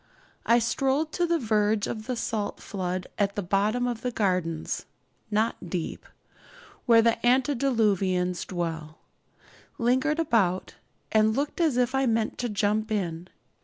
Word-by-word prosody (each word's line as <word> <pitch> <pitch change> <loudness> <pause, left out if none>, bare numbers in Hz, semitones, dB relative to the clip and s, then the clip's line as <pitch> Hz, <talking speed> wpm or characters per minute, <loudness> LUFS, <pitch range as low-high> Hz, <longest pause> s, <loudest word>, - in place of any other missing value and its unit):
I 235 - +6
strolled 270 +6 0
to 350 +1 0
the 340 0 +2
verge 215 -4 +1
of 215 -1 -5
the 255 - -1
salt 220 -3 -3
flood 185 -2 -4
at 200 -1 +1
the 205 - -2
bottom 205 +7 +1
of 240 -2 -3
the 250 - -1
gardens 180 -8 -1 0.4
(not 215 -4 -1
deep), 170 -1 -4 0.8
where 230 -1 +6
the 230 0 +1
antediluvians 225 -9 +2
dwell, 165 -3 -4 0.8
lingered 260 +5 +1
about, 220 - +1 0.4
and 220 0 +3
looked 285 +5 -2
as 310 -7 +2
if 250 0 +2
I 270 0 +2
meant 225 -1 0
to 245 - -1
jump 210 +1 0
in. 175 -4 -2
220 Hz, 140 wpm, -27 LUFS, 190-245 Hz, 0.8 s, I